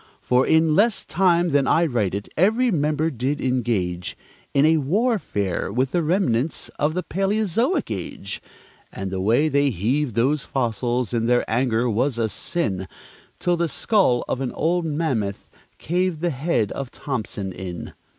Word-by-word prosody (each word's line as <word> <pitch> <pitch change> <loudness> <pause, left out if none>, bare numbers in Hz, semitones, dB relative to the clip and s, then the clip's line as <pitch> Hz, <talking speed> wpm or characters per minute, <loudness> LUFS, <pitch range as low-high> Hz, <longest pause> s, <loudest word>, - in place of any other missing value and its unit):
For, 125 +1 +2
in 160 0 +4
less 210 +3 +2
time 175 +1 +2
than 140 -2 +2
I 170 - +4
write 110 - 0
it, 100 0 -4
every 225 +8 +3
member 155 -1 +1
did 135 +4 -2
engage 110 -9 -1 0.3
In 140 +1 +4
a 160 +1 +5
warfare 155 - 0
with 130 +4 0
the 175 - +1
remnants 160 - 0
of 155 +4 +1
a 180 - 0
palæozoic 210 - 0
age; 95 +1 -6 0.5
And 95 -1 -5
the 95 -1 -2
way 120 +10 +3
they 140 -1 +2
heaved 120 - -1
those 135 +5 +2
fossils 120 -1 -1
in 115 -1 +1
their 120 0 +2
anger 120 0 +1
was 120 +3 0
a 115 -1 0
sin, 100 - -3 0.5
Till 175 -1 +1
the 170 0 +1
skull 190 - +2
of 130 - -2
an 130 - -2
old 170 +2 0
mammoth 145 -11 -2 0.3
caved 175 -1 -1
the 175 -1 +1
head 135 - 0
of 140 -2 -4
Thompson 110 -9 -4
in. 90 -1 -7
140 Hz, 160 wpm, -23 LUFS, 115-170 Hz, 0.5 s, a